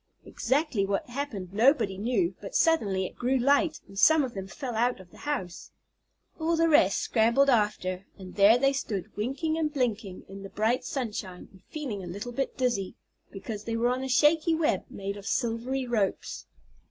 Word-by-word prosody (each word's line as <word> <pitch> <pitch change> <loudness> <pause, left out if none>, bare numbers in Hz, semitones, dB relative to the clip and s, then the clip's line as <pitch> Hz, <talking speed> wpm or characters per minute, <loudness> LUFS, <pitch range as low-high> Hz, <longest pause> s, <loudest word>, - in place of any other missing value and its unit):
Exactly 265 -4 0
what 195 0 -1
happened 235 -9 -5
nobody 220 -3 +3
knew, 195 -3 0
but 195 - -8
suddenly 200 - +2
it - - -8
grew 255 +2 +1
light, 285 +5 +2
and 195 0 -7
some 315 +3 +6
of 250 -3 -4
them 195 -1 -6
fell 255 +4 -6
out 240 +1 +1
of 185 -2 -15
the - - -16
house. 185 -12 -4 0.7
All 325 +1 +1
the 330 0 +3
rest 200 - +4
scrambled 235 +5 +3
after, 200 -4 0
and 185 -2 -10
there 205 +3 +6
they 275 +2 +2
stood, 210 -9 -4
winking 285 +9 -1
and 305 -2 0
blinking 225 -9 -2
in 195 0 -9
the 195 - -8
bright 225 +5 0
sunshine, 215 - -5
and 190 - -19
feeling 255 -11 -5
a - - -7
little 200 +7 -6
bit 270 +3 -3
dizzy, 235 -7 -1 0.3
because 210 +1 -7
they 230 - -2
were 240 +1 +2
on 255 +1 -1
a 265 - -4
shaky 310 +5 +4
web 320 0 0
made 200 +1 -5
of 200 - -9
silvery 245 +2 -1
ropes. 220 -5 -2
235 Hz, 185 wpm, -28 LUFS, 195-275 Hz, 0.7 s, some